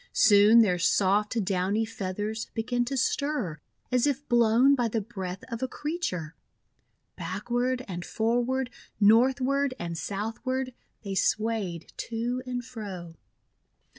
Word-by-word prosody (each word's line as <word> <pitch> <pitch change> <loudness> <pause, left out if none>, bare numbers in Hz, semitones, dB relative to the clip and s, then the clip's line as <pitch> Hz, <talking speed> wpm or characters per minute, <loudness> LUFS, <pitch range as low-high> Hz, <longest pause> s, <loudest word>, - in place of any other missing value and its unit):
Soon 210 +2 +7
their 180 -4 +1
soft, 205 +4 +2
downy 195 +3 +1
feathers 210 +1 -4
began 245 +2 0
to 270 +2 -3
stir 250 - -1 0.3
as 250 +2 +3
if 285 0 -2
blown 240 +3 +5
by 245 -4 +2
the 225 0 -1
breath 195 -4 -6
of 230 -2 -5
a 260 - 0
creature. 255 - -3 0.8
Backward 240 +8 -2
and 175 -2 -5
forward, 245 +5 0 0.3
northward 260 +5 +4
and 170 -1 -4
south 205 +6 -4
ward, 260 -1 -2 0.3
they 200 -2 -4
swayed 215 -5 -1 0.2
to 240 +2 -2
and 245 -1 -3
fro. 200 -9 -7
225 Hz, 125 wpm, -27 LUFS, 195-255 Hz, 0.8 s, Soon